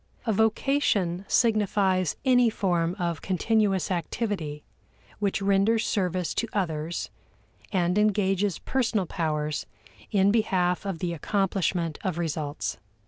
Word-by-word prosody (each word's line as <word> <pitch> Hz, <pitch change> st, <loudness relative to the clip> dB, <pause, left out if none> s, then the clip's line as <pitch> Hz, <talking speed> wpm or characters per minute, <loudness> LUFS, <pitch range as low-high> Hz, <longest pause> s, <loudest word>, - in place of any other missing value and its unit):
A 225 Hz, -, +1 dB
vocation 210 Hz, -5 st, +1 dB
signifies 200 Hz, -, +2 dB
any 245 Hz, -2 st, +5 dB
form 175 Hz, -5 st, 0 dB
of 170 Hz, -5 st, -2 dB
continuous 195 Hz, 0 st, +1 dB
activity 170 Hz, -4 st, -3 dB, 0.6 s
which 200 Hz, -1 st, 0 dB
renders 200 Hz, +3 st, +3 dB
service 180 Hz, -4 st, -1 dB
to 230 Hz, -, -1 dB
others 165 Hz, -4 st, -2 dB, 0.6 s
and 180 Hz, 0 st, +1 dB
engages 200 Hz, -3 st, +2 dB
personal 230 Hz, -7 st, 0 dB
powers 155 Hz, -3 st, -2 dB, 0.4 s
in 200 Hz, -1 st, +3 dB
behalf 185 Hz, -4 st, +1 dB
of 190 Hz, -4 st, -2 dB
the 175 Hz, 0 st, -2 dB
accomplishment 180 Hz, -2 st, -1 dB
of 185 Hz, -3 st, -2 dB
results. 155 Hz, -3 st, -3 dB
190 Hz, 110 wpm, -26 LUFS, 170-210 Hz, 0.6 s, any